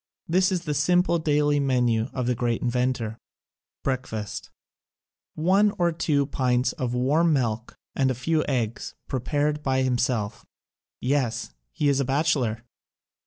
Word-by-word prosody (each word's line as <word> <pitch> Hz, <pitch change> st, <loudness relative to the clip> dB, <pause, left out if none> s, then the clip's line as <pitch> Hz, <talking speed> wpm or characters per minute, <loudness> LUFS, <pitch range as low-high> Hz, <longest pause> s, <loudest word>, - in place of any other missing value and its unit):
This 185 Hz, +3 st, +3 dB
is 180 Hz, -2 st, -1 dB
the 150 Hz, -3 st, -2 dB
simple 170 Hz, +4 st, +2 dB
daily 150 Hz, -1 st, +2 dB
menu 125 Hz, -4 st, +1 dB
of 130 Hz, -2 st, -2 dB
the 125 Hz, -, +2 dB
great 120 Hz, -1 st, -1 dB
inventor: 125 Hz, -2 st, -1 dB, 0.6 s
Breakfast: 125 Hz, -6 st, -3 dB, 0.9 s
One 195 Hz, +6 st, +3 dB
to 175 Hz, -1 st, +2 dB
two 150 Hz, -3 st, +1 dB
pints 125 Hz, -2 st, +1 dB
of 125 Hz, -1 st, -3 dB
warm 155 Hz, +7 st, +3 dB
milk 115 Hz, -4 st, -1 dB, 0.2 s
and 135 Hz, -1 st, +2 dB
a 130 Hz, -, 0 dB
few 155 Hz, +5 st, 0 dB
eggs, 120 Hz, -5 st, -2 dB
prepared 145 Hz, +3 st, -1 dB
by 130 Hz, -2 st, +1 dB
himself 125 Hz, -4 st, -1 dB, 0.3 s
— -, -, -68 dB, 0.2 s
yes, 130 Hz, -3 st, -1 dB, 0.2 s
he 145 Hz, -, 0 dB
is 140 Hz, -1 st, +3 dB
a 140 Hz, -, +1 dB
bachelor! 135 Hz, -5 st, 0 dB
135 Hz, 140 wpm, -25 LUFS, 125-150 Hz, 0.9 s, This